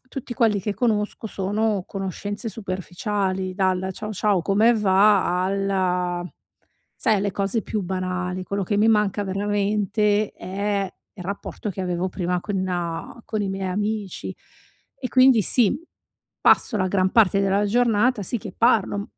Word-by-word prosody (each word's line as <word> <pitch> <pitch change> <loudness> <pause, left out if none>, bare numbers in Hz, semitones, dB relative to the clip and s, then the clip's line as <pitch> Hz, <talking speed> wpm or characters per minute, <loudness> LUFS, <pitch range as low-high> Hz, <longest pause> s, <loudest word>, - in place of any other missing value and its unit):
tutti 250 -2 -6
quelli 215 -4 +2
che 205 +1 -3
conosco 220 -2 -1
sono 205 0 -1
conoscenze 205 +3 -4
superficiali 190 -1 -3
dal: 185 -1 0
"Ciao, 215 +3 -5
ciao 200 -3 +1
come 215 +5 +4
va?" 195 -3 +3
alla 185 -2 0 0.7
sai, 220 - +1
alle 200 0 0
cose 200 +2 -1
più 215 - -3
banali. 185 0 -3
Quello 200 +1 -3
che 205 +3 -1
mi 215 +2 +4
manca 210 -2 +2
veramente 205 +1 0
è, 200 +1 -2 0.3
e 185 - -8
rapporto 200 +2 -5
che 190 - -6
avevo 180 0 -1
prima 180 -1 -1
con 180 0 -3
con 215 -2 -3
i 200 - -1
miei 195 -1 -3
amici. 205 0 -3 0.6
E 255 - -4
quindi, 255 -3 +6
sì, 230 +3 +3 0.7
passo 225 - +4
la 185 -2 +1
gran 185 0 +2
parte 200 -3 +4
della 195 +1 +2
giornata, 235 +1 +2
sì, 240 - -1
che - - -7
parlo, 225 -4 +3
mhmm, 200 - -3
200 Hz, 145 wpm, -23 LUFS, 185-210 Hz, 0.7 s, quindi